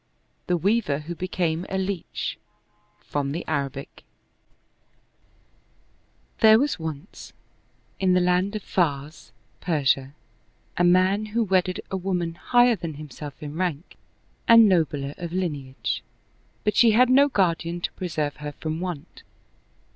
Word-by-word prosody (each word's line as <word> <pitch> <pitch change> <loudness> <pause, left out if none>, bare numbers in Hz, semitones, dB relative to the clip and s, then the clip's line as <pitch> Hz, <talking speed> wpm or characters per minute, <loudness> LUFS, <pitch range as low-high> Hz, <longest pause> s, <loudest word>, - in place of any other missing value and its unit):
The 180 - +2
Wea\)er 185 -6 +1
Who 175 - -4
Became 175 -1 -2
a 190 - -2
Leach 190 -2 -3 0.6
From 140 -1 -3
the 170 - -5
Arabic 140 -3 -4 2.4
T*HERE 220 0 +7
was 285 -4 0
once, 160 +2 -7 0.7
in 185 -1 +3
the 180 - +4
land 180 +3 +1
of 215 - -4
Pars 150 -3 -2 0.3
(Persia), 140 -4 0 0.6
a 175 - +1
man 185 +4 +3
who 235 - +4
wedded 185 -2 +1
a 190 - -1
woman 180 -3 -2
higher 245 +7 +3
than 165 -5 -6
himself 150 0 -9
in 145 -1 -6
rank 175 -2 -3 0.5
and 230 -1 +8
nobler 150 -6 +1
of 170 -1 -5
lineage, 145 -8 -3 0.6
but 210 -1 0
she 230 -3 +6
had 250 +3 +5
no 280 +2 +6
guardian 175 -6 0
to - - -2
preserve 155 -5 -3
her 150 0 -6
from 160 +2 -4
want. 175 -5 -6
175 Hz, 130 wpm, -25 LUFS, 150-190 Hz, 2.4 s, and